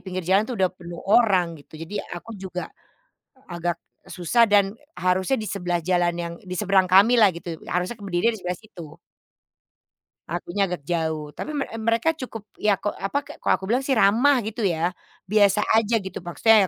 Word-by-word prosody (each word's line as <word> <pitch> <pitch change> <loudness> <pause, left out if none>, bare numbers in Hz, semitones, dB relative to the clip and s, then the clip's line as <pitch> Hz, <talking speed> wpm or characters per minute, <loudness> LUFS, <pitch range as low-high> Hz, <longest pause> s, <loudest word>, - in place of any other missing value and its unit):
pinggir 185 -2 -5
jalan 195 +5 +2
tuh 245 - -3
udah 185 -1 +1
penuh 175 -1 -10
orang 195 -5 +4
gitu, 155 - -14
jadi 165 +6 -5 0.2
aku 230 +6 -9
juga, 180 -1 -6 0.8
agak 170 -1 -3 0.2
susah 190 +7 +2
dan 205 -2 +3 0.2
harusnya 185 +7 +1
di 215 - -4
sebelah 175 -3 -1
jalan 175 0 +1
yang 170 0 -4
di 185 -1 -6
seberang 190 -3 +2
kamilah 210 +1 +6
gitu, 170 0 -6 0.2
harusnya 180 +6 -1
ke 205 - -14
berdirinya 195 +5 +1
di - - -10
sebelah 180 0 -3
situ. 175 -9 -12 1.3
Akunya 175 +3 -1
agak 175 -5 -5
jauh, 160 -3 -2
tapi - - -6
me 275 - 0
eee, 225 - -7
mereka 230 +8 +2
cukup 250 -8 -8 0.2
ya 210 -2 +3
ko 205 +2 -2
apa, 195 +9 -2
kayak - - -11
kalau - - +3
aku 190 - -11
bilang 250 +4 +2
sih 265 -3 +2
ramah 230 +8 +5
gitu 220 +2 -5
ya, 170 0 0 0.4
biasa 210 -1 +4
aja 225 +1 +3
gitu, 190 - -6
maksudnya 220 +6 +4
190 Hz, 185 wpm, -24 LUFS, 175-220 Hz, 1.3 s, kamilah